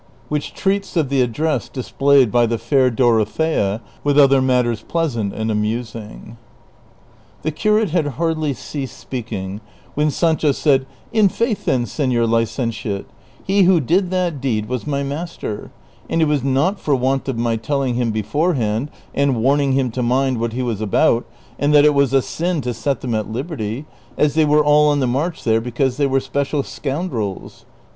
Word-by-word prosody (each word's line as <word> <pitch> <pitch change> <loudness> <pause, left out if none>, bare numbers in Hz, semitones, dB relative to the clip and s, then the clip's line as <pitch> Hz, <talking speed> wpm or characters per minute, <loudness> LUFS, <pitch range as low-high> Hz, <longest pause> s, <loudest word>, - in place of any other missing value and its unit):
WHICH 150 -1 -3
TREATS 195 -1 -1
OF 155 -5 +1
THE 135 -1 +2
ADDRESS 125 +1 -1
DISPLAYED 135 0 +2
BY 120 -1 +4
THE 115 +1 -1
FAIR 130 +1 +2
DOROTHEA, 115 -1 +1 0.2
WITH 145 0 +2
OTHER 135 -2 +6
MATTERS 125 -4 +1
PLEASANT 125 -12 -1
AND 110 +2 -2
AMUSING. 110 +1 -4 1.1
The 155 - 0
curate 210 +3 +1
had 165 -3 +1
hardly 160 -3 0
ceased 135 -2 -6
speaking, 105 -5 -5 0.3
when 150 +3 +1
Sancho 160 -1 +1
said, 135 -2 +2
" - - -29
In 215 -3 +4
faith, 230 +1 -1
then, 125 -2 +1
sefior 120 -1 0
licentiate, 115 -3 -1 0.4
he 195 +1 +2
who 180 -1 +5
did 175 +7 +1
that 175 -6 -1
deed 110 -6 -1
was 125 +3 -4
my 140 -1 -1
master; 145 -6 -5 0.4
and - - 0
it 160 - +4
was 150 -3 0
not 140 +9 +1
for 145 - +1
want 130 +2 0
of 130 - -2
my 115 0 0
telling 130 +3 -1
him 120 -1 0
beforehand 120 - 0 0.2
and 140 -3 +1
warning 135 +3 +2
him 130 -2 +1
to 125 - -3
mind 130 +1 +1
what 115 0 -2
he 130 +1 -2
was 115 -4 -2
about, 110 +3 +2 0.3
and 145 +1 +2
tliat 145 - +7
it 150 0 +5
was 140 -2 +2
a 135 -1 +3
sin 175 0 -2
to 125 -1 -3
set 135 +3 -2
them 125 -3 -3
at 110 -1 -2
liberty, 130 -1 -4 0.3
as 150 -2 +2
they 160 0 +3
were 150 0 +3
all 150 0 +5
on 145 -1 +2
the 130 - +1
march 145 +8 -2
there 115 -1 +2
because 125 +2 -1
they 145 -1 +2
were 135 0 +2
special 140 +1 -2
scoundrels." 135 - -4
135 Hz, 180 wpm, -19 LUFS, 115-150 Hz, 1.1 s, tliat